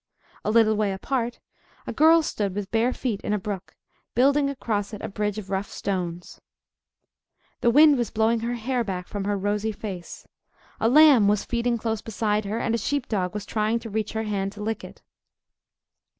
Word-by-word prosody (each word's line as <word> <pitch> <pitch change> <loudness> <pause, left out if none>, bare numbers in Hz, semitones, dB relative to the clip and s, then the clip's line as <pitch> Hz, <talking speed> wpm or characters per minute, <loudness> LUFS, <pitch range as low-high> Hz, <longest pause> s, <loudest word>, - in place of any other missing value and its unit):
A - - -1
little 220 -1 +4
way 210 -2 0
apart, 240 +4 -2 0.5
a - - -4
girl 325 +1 +5
stood 200 -9 -2
with 205 -2 -4
bare 230 +2 +2
feet 235 -6 -3
in 210 - -2
a - - +2
brook, 195 -1 -6 0.4
building 275 +3 +3
across 220 -6 -3
it 205 - -10
a - - -2
bridge 210 0 -2
of 200 -2 -7
rough 195 +1 -2
stones. 180 -3 -4 1.2
The 240 - +3
wind 290 +2 +6
was 235 -4 -1
blowing 225 +1 +1
her 235 +2 -2
hair 245 +1 -1
back 185 -4 -4
from 200 -2 -4
her 205 0 0
rosy 205 +2 -1
face. 195 -5 -8 0.5
A 225 - +2
lamb 280 -6 +7
was 210 0 +1
feeding 235 0 0
close 225 -1 -2
beside 215 -1 -1
her; 210 +3 -2
and 230 -1 -1
a 230 - +1
sheepdog 215 -8 -2
was 210 -1 -4
trying 215 +1 0
to 225 -1 -8
reach 215 0 -2
her 220 0 -2
hand 200 -2 -2
to 210 0 -7
lick 220 0 -3
it. - - -12
215 Hz, 190 wpm, -25 LUFS, 205-235 Hz, 1.2 s, lamb